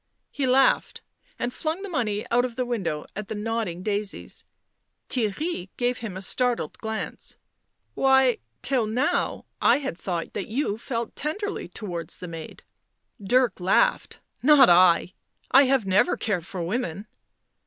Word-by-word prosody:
He 275 -2 -1
laughed, 265 +1 +3 0.4
and 245 +1 -2
flung 325 +5 -2
the - - -4
money 225 - -1
out 245 +1 +4
of 245 -2 -3
the 255 0 -1
window 190 -11 -2
at 210 0 -5
the - - -4
nodding 210 -5 -3
daisies. 205 -1 -3 0.6
Theirry 225 - -2
gave 245 0 0
him 205 -5 -6
a 190 - -5
startled 245 +4 0
glance. 220 -1 -5 0.3
" - - -49
Why, 265 -2 +4 0.2
till 250 -5 +1
now 250 +7 0 0.2
I - - +5
had 265 - -5
thought 175 -3 -3
that 195 - -4
you 220 -2 -1
felt 235 -1 -4
tenderly 405 +8 -3
towards 170 -6 -6
the 180 - -7
maid." 165 -2 -9 0.6
Dirk 245 +1 +2
laughed. 195 - +1 0.2
"Not 275 -5 +7
I. 180 0 +5 0.4
I 275 +2 +7
have 265 -4 +2
never 195 +5 +3
cared 185 -6 -2
for 180 -3 -4
women." 195 0 -3
225 Hz, 150 wpm, -25 LUFS, 190-260 Hz, 0.6 s, Not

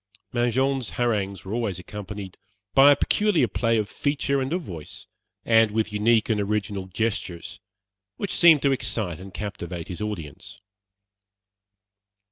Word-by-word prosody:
Mangin's 130 +2 +1
harangues 100 -6 -1
were 95 - -5
always 110 -6 -1
accompanied 100 0 -8 0.4
by 140 +2 +8
a - - +6
peculiar 205 - +2
play 115 +3 +1
of 105 -2 0
feature 140 +1 -1
and 130 +2 -3
of 175 +1 -1
voice, 80 - -8 0.4
and 115 -1 +5
with 110 0 -1
unique 110 +1 +3
and 110 -3 +1
original 100 -2 -2
gestures, 95 -4 -3 0.6
which 200 - -3
seemed 165 -4 +6
to 140 - +4
excite 105 -9 -2
and 95 +1 -10
captivate 90 -5 -6
his 90 +2 -6
audience. 100 -2 -6
105 Hz, 135 wpm, -25 LUFS, 95-125 Hz, 0.6 s, by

